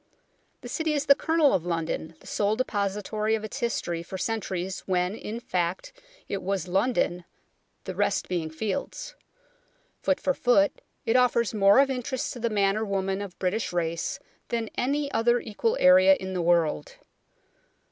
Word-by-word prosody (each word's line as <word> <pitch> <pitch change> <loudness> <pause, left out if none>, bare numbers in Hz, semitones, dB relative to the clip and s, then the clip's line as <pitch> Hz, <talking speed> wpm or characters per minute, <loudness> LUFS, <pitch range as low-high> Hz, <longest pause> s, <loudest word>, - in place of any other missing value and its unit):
The - - -8
City 320 -2 -1
is 290 -1 0
the 280 - +8
kernel 320 0 +2
of 175 - +1
London, 165 -1 -3
the - - -18
sole 205 +1 0
depository 210 -1 -1
of 220 - -5
its 215 +5 -6
history 175 -8 -2
for 190 +3 -7
centuries, 190 -4 -3
when, 180 0 +1
in 220 +1 -6
fact, 185 - -2 0.3
it 200 - -3
was 190 -2 -2
London, 190 -2 +1 0.6
the - - -5
rest - - 0
being 170 -3 -2
fields. 205 - -4 0.9
Foot 285 - +1
for 275 - +1
foot, 240 -7 +2 0.2
it 225 - +1
offers 240 -3 +3
more 200 0 +5
of 275 0 +5
interest 260 0 -3
to 245 - -8
the 235 0 0
man 200 -1 +2
or 220 - -1
woman 195 -1 -1
of 195 -3 -7
British 195 +4 -1
race 170 +6 -2 0.3
than 230 -2 -2
any 280 +2 0
other 240 +1 +3
equal 225 0 -1
area 185 +1 +7
in 190 0 -6
the 180 - -1
world. 170 - +1
205 Hz, 165 wpm, -26 LUFS, 180-240 Hz, 0.9 s, the